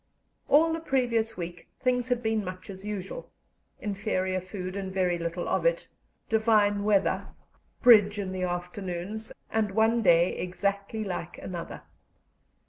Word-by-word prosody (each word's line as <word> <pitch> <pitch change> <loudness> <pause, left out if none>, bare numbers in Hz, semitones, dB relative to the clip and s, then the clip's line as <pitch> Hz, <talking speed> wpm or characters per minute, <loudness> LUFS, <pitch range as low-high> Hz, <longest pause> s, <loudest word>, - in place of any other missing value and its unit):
All 320 +3 +5
the 325 - -2
previous 240 -7 0
week 175 -1 -6
things 250 -1 +1
had 245 -1 0
been 220 -1 +1
much 185 +1 -7
as 190 0 -10
usual: 210 - -5 0.5
inferior 190 -2 -1
food, 185 0 -6
and 195 -1 -4
very 180 -2 +1
little 170 +1 -3
of - - +1
it; - - +1 0.4
divine 215 -2 +3
weather; 205 -2 +2 0.6
"bridge" 210 -4 +7
in 195 -2 -3
the 185 -1 -4
afternoons; 180 +3 -4 0.2
and 220 -1 +1
one 225 +1 +3
day 175 -3 +4
exactly 200 +4 -2
like 180 -4 -5
another. 175 -2 -7
200 Hz, 135 wpm, -28 LUFS, 185-225 Hz, 0.6 s, bridge